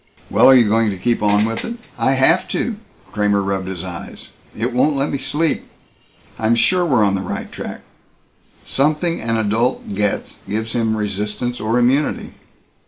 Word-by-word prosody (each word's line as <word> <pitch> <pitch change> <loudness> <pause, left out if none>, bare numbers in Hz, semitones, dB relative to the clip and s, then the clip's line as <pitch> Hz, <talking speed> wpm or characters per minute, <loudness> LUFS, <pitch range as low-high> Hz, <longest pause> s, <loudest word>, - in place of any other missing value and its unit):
"Well - - +6
are 135 - +8
you 120 -4 +5
going 110 +1 +2
to 100 - -4
keep 120 +6 0
on 105 0 +3
with 115 0 -3
it?" 235 - -4 0.2
"I 135 - +1
have 135 +7 +3
to." 225 -4 -2 0.3
Kramer 105 -1 +1
rubbed 95 -1 -2
his 95 -2 -5
eyes. 90 -2 -8 0.3
"It 120 +3 -1
won't 145 +4 +2
let 140 +1 0
me 140 - -2
sleep. 150 +4 -1 0.7
I'm 110 +1 +2
sure 180 +9 +2
we're 130 -10 +3
on 100 -1 +2
the 95 - -1
right 95 - -5
track. - - -7 0.8
Something 155 +4 0
an 115 0 0
adult 110 +2 0
gets 105 0 -2
gives 110 +2 -2
him 110 -2 0
resistance 105 +4 -3
or 110 +3 0
immunity." 130 +5 +1
115 Hz, 170 wpm, -19 LUFS, 105-135 Hz, 0.8 s, are